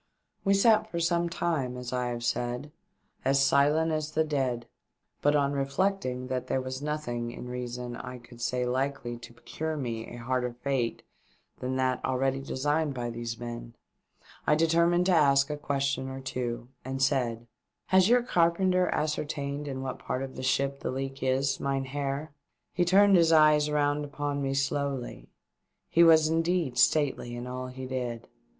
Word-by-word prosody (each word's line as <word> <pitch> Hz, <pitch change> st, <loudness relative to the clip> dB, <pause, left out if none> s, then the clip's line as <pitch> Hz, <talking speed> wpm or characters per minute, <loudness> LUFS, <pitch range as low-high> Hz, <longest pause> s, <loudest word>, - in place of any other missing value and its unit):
We 195 Hz, -1 st, +3 dB
sat 215 Hz, +1 st, +4 dB
for 170 Hz, -, -3 dB
some 170 Hz, 0 st, +1 dB
time, 150 Hz, -8 st, -1 dB
as 125 Hz, 0 st, -6 dB
I 125 Hz, -1 st, 0 dB
have 120 Hz, -1 st, -4 dB
said, 125 Hz, +4 st, -2 dB, 0.5 s
as 135 Hz, +1 st, +3 dB
silent 150 Hz, +4 st, +3 dB
as 155 Hz, -1 st, -2 dB
the 160 Hz, -, +3 dB
dead; 130 Hz, -6 st, -1 dB, 0.6 s
but 145 Hz, +1 st, +3 dB
on 140 Hz, -1 st, +2 dB
reflecting 140 Hz, -1 st, -1 dB
that 130 Hz, -1 st, -3 dB
there -, -, 0 dB
was 130 Hz, +1 st, -5 dB
nothing, 130 Hz, -6 st, -3 dB
in 120 Hz, +1 st, -8 dB
reason, 125 Hz, 0 st, -5 dB
I 125 Hz, +1 st, -7 dB
could 120 Hz, 0 st, -14 dB
say 125 Hz, +1 st, 0 dB
likely 130 Hz, -1 st, -2 dB
to 120 Hz, -, -11 dB
procure 155 Hz, +6 st, -5 dB
me 115 Hz, -5 st, -4 dB
a -, -, -9 dB
harder 125 Hz, +1 st, -2 dB
fate 130 Hz, -4 st, -1 dB, 0.6 s
than 130 Hz, +1 st, -2 dB
that 130 Hz, -1 st, 0 dB
already 135 Hz, +1 st, 0 dB
designed 145 Hz, +2 st, -1 dB
by 120 Hz, -1 st, -3 dB
these 115 Hz, 0 st, -5 dB
men, 120 Hz, 0 st, -7 dB, 0.7 s
I 150 Hz, -, +5 dB
determined 170 Hz, +2 st, +3 dB
to 190 Hz, -, +3 dB
ask 140 Hz, -3 st, +4 dB
a -, -, -1 dB
question 140 Hz, -2 st, -1 dB
or 135 Hz, 0 st, -6 dB
two, 120 Hz, -2 st, -4 dB
and 135 Hz, +1 st, -4 dB
said 125 Hz, -4 st, +1 dB, 0.4 s
"Has 190 Hz, +1 st, +5 dB
your 245 Hz, 0 st, +5 dB
car 170 Hz, -8 st, +3 dB
penter 185 Hz, +1 st, +1 dB
ascertained 150 Hz, -1 st, -2 dB
in 135 Hz, -1 st, -4 dB
what 130 Hz, -, -4 dB
part 130 Hz, -, -3 dB
of 135 Hz, -1 st, -7 dB
the -, -, -6 dB
ship 140 Hz, +1 st, 0 dB
the -, -, -3 dB
leak 135 Hz, +1 st, -4 dB
is, 135 Hz, +1 st, +1 dB
mynheer 140 Hz, +2 st, -2 dB, 0.2 s
?" -, -, -53 dB
He 175 Hz, 0 st, +2 dB
turned 195 Hz, +2 st, +6 dB
his 165 Hz, -2 st, +5 dB
eyes 155 Hz, -1 st, +5 dB
round 145 Hz, 0 st, +1 dB
upon 145 Hz, 0 st, -3 dB
me 135 Hz, 0 st, -1 dB
slowly. 135 Hz, -, -2 dB, 0.6 s
He 170 Hz, -, +6 dB
was 160 Hz, -2 st, +7 dB
indeed 165 Hz, -5 st, 0 dB
stately 135 Hz, -6 st, +2 dB
in 120 Hz, 0 st, -5 dB
all 130 Hz, 0 st, -5 dB
he 130 Hz, +1 st, -7 dB
did. 125 Hz, -3 st, -4 dB
135 Hz, 170 wpm, -28 LUFS, 125-155 Hz, 0.7 s, was